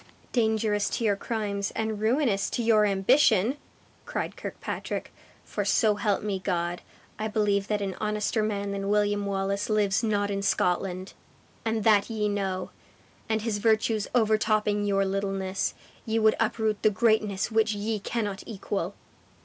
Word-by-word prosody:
"Dangerous 220 -3 +1
to - - -2
your 205 -3 +3
crimes, 205 -2 -2
and 220 -1 -2
ruinous 225 -3 +2
to 240 - -2
your 215 -2 +4
ambition!" 220 +3 +3 0.5
cried - - -3
Kirkpatrick; - - -5 0.3
"for - - -3
so 215 -3 +3
help 205 -1 0
me 200 -2 -1
God, 175 -2 -2 0.4
I 215 - -1
believe 210 -2 +1
that 210 -1 0
an 195 -1 -2
honester 210 +1 0
man 205 -2 -1
than 200 0 -3
William 205 -1 +1
Wallace 195 +1 -1
lives 210 -1 +2
not 205 -3 0
in 200 0 -1
Scotland! 185 0 0 0.5
And 225 -1 -1
that 210 -1 +4
ye 215 -2 -1
know, 195 -2 -2 0.6
and 220 -1 0
his 220 -3 -1
virtues 220 -1 +2
overtopping 215 -2 +2
your 195 -1 +2
littleness, 195 -1 -2 0.3
ye 225 0 -1
would 220 -1 +5
uproot 220 -1 0
the 215 - +5
greatness 215 -1 +1
which 220 0 +2
ye 210 +1 -2
cannot 205 -2 -3
equal." 200 -3 -3
210 Hz, 150 wpm, -27 LUFS, 200-220 Hz, 0.6 s, would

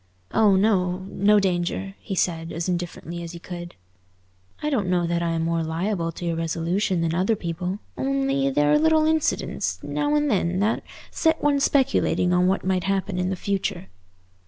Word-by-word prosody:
"Oh 210 -3 +4
no, 190 -2 +2
no 210 +2 +4
danger," 190 +1 -1
he 195 - -5
said 165 -2 -1
as 165 +2 -3
indifferently 175 -1 -4
as 170 0 -7
he - - -7
could. 175 -1 -8 0.9
"I 300 - 0
don't 210 -9 0
know 175 -1 +2
that 170 0 0
I 170 - 0
am 165 0 -1
more 165 0 0
liable 165 +2 -1
to 175 - -7
irresolution 170 +3 0
than 165 -1 0
other 190 +6 +2
people; 180 +1 -3 0.2
only 135 +1 0
there 145 +2 +2
are - - +5
little 315 0 +4
incidents 315 -1 0
now 295 0 0
and 295 0 +2
then 185 -6 +1
that 215 +3 +1 0.3
set 320 -1 +1
one 290 -1 +3
speculating 265 -10 +2
on 180 0 +3
what 190 0 0
might 185 -1 0
happen 195 -1 -1
in 180 0 0
the 190 - -1
future." 195 -1 -3
180 Hz, 180 wpm, -24 LUFS, 170-205 Hz, 0.9 s, are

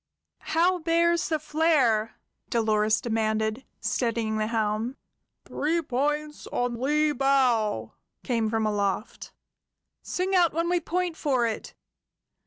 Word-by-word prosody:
"How 355 +2 +3
bears 335 +1 +2
the 315 - +1
flare?" 295 -9 +2 0.3
Dolores 215 -1 +2
demanded, 220 +1 -1 0.2
steadying 230 -3 -1
the 215 0 0
helm. 220 +3 -1 0.5
"Three 320 +4 0
points 295 +3 -2
on 245 -1 -2
lee 300 +3 +2
bow!" 255 -6 +1 0.3
came 230 -4 0
from 220 0 0
aloft. 205 0 -2 0.7
"Sing 370 +2 -2
out 350 -3 +4
when 335 +2 0
we 355 0 +2
point 350 -1 -2
for 260 -5 +1
it!" 225 -1 -4
250 Hz, 115 wpm, -26 LUFS, 220-315 Hz, 0.7 s, out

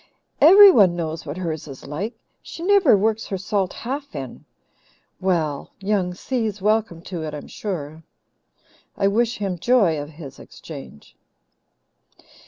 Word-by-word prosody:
Everyone 320 - +8
knows 160 -2 -4
what 145 +4 -5
hers 160 -4 -4
is 135 -2 -10
like. 190 - -5 0.3
She 335 - -9
never 375 - +5
works 220 +2 0
her 195 - -3
salt 195 -1 -1
half 275 +3 -6
in. 130 -2 -7 0.7
Well, 165 -6 -1
Young 190 -3 -1
Si's 220 -2 -3
welcome 210 -4 0
to 180 -3 -6
it, 155 -1 -5
I'm 150 - -8
sure; 160 -6 -6 1.0
I 195 - +2
wish 230 +4 +1
him 195 -4 -3
joy 190 -9 +2
of 145 - -8
his 145 -4 -11
exchange." 140 - -12
190 Hz, 135 wpm, -22 LUFS, 160-220 Hz, 1.0 s, Everyone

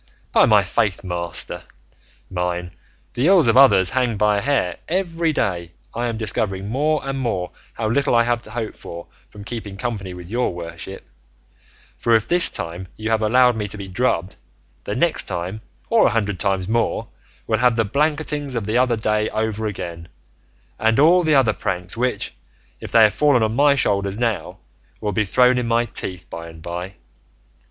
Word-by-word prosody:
By - - +5
my - - +5
faith, 100 -2 -1
master 85 -2 -5 0.7
mine, 90 -1 -3 0.4
the 125 +6 +1
ills 185 -5 +6
of 115 - +3
others 130 -9 +6
hang 125 -4 0
by 105 0 +3
a - - -4
hair; 125 -9 0
every 170 -2 0
day 85 - -2 0.2
I 120 +1 -2
am 115 -2 -3
discovering 100 -3 -2
more 150 +6 +1
and 135 0 -2
more 95 -8 -2 0.2
how 110 - -2
little 130 +2 +1
I 115 - +5
have 120 0 0
to 115 - -11
hope 110 -1 -4
for 85 0 -9 0.2
from 105 - -11
keeping 105 -3 -6
company 100 -6 -4
with 90 +1 -10
your 120 -6 0
worship; 85 +3 -8 0.9
for 115 - +3
if 110 - +1
this 175 0 +5
time 85 +3 -5
you 110 +1 -3
have 110 -1 +2
allowed 125 +3 +4
me 105 -2 -3
to 105 - -4
be 100 -1 -7
drubbed, 95 -3 -1 0.5
the - - -3
next - - +1
time, 90 +4 -3 0.3
or 230 -1 +4
a 120 - -1
hundred 105 -4 -1
times 95 -2 0
more, 115 +2 0 0.4
we'll 110 -1 0
have 125 -1 +3
the 115 -1 +1
blanketings 145 +2 -1
of 115 -3 -2
the 110 +4 +1
other 125 -2 +3
day 110 -1 0
over 110 0 -2
again, 85 -4 -6 0.7
and 110 +3 +2
all 170 +5 +6
the 155 -3 +2
other 125 -6 +4
pranks 90 0 -4
which, 125 +2 -1 0.5
if - - -8
they 115 - +6
have 105 -2 +5
fallen 140 -4 +3
on 110 0 0
my 140 +1 +5
shoulders 100 -5 0
now, 115 -3 -2 0.4
will 105 - -2
be 105 +2 0
thrown 125 +5 +4
in 120 - -2
my 115 +1 +2
teeth 90 -4 -4
by 85 0 -8
and 80 -1 -13
by. 90 +3 -5
110 Hz, 185 wpm, -21 LUFS, 95-125 Hz, 0.9 s, ills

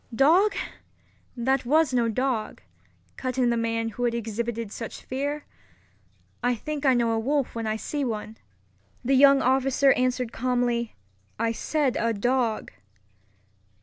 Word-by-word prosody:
"Dog! 340 - +4 0.8
that 260 +3 +1
was 295 +2 +2
no 235 -2 +2
dog," 245 -1 -2 0.5
cut 255 0 -3
in 245 -2 +3
the - - +1
man 230 0 -1
who 245 +2 -3
had 235 -1 0
exhibited 230 -1 -3
such 225 0 -7
fear. 285 +3 -3 1.0
"I 245 0 +1
think 290 +4 -3
I 260 - +5
know 235 -1 +2
a 225 - +1
wolf 275 +3 0
when 230 -1 -3
I 215 - 0
see 285 +6 -3
one." 220 -2 -4 0.7
The 270 - +2
young 275 0 +6
officer 270 +2 +3
answered 250 -1 0
calmly, 245 -1 -1 0.4
"I 230 +1 0
said 275 +4 0
a 230 0 +1
dog." 240 +1 0
245 Hz, 145 wpm, -26 LUFS, 230-270 Hz, 1.0 s, young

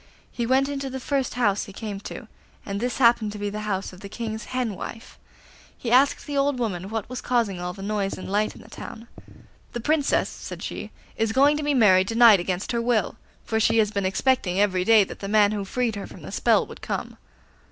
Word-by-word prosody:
He 235 -1 -3
went 265 +2 +3
into 275 -1 -3
the 265 0 -5
first 270 0 -1
house 205 -5 +1
he 200 - -11
came 205 -1 -5
to, - - -8 0.4
and 200 0 -3
this 245 +2 -2
happened 235 -4 +4
to - - -7
be 205 0 -3
the 210 - -4
house 190 -1 -2
of 180 - -12
the 200 - -9
King's 220 0 -5
hen 250 -4 -2
wife. 225 +4 -9 0.6
He 235 - -4
asked 265 +3 +4
the 290 - -5
old 280 -1 +2
woman 195 -6 -3
what 220 -1 -3
was 255 0 -6
causing 230 -7 0
all 180 0 -3
the 195 - -9
noise 200 -1 -2
and - - -7
light 210 +2 0
in - - -13
the - - -16
town. 230 +1 -9 0.7
'The 240 - -3
Princess,' 295 +2 +2
said - - -8
she, - - -5 0.3
'is 225 0 +1
going 280 +4 +5
to 300 - -2
be 290 -1 +1
married 190 -6 +5
to 225 - -3
night 230 -4 +8
against 180 +1 -2
her 235 -1 0
will, 230 -4 +1 0.3
for 220 - 0
she 225 +1 +3
has 210 -2 +3
been 200 -2 0
expecting 195 -3 +1
every 185 -3 +2
day 220 +1 +6
that - - -9
the 195 - -5
man 205 0 +4
who 210 -2 -2
freed 230 +3 -1
her 200 - -6
from - - -13
the - - -8
spell - - +3
would - - -12
come. - - -4
220 Hz, 235 wpm, -24 LUFS, 200-250 Hz, 0.7 s, night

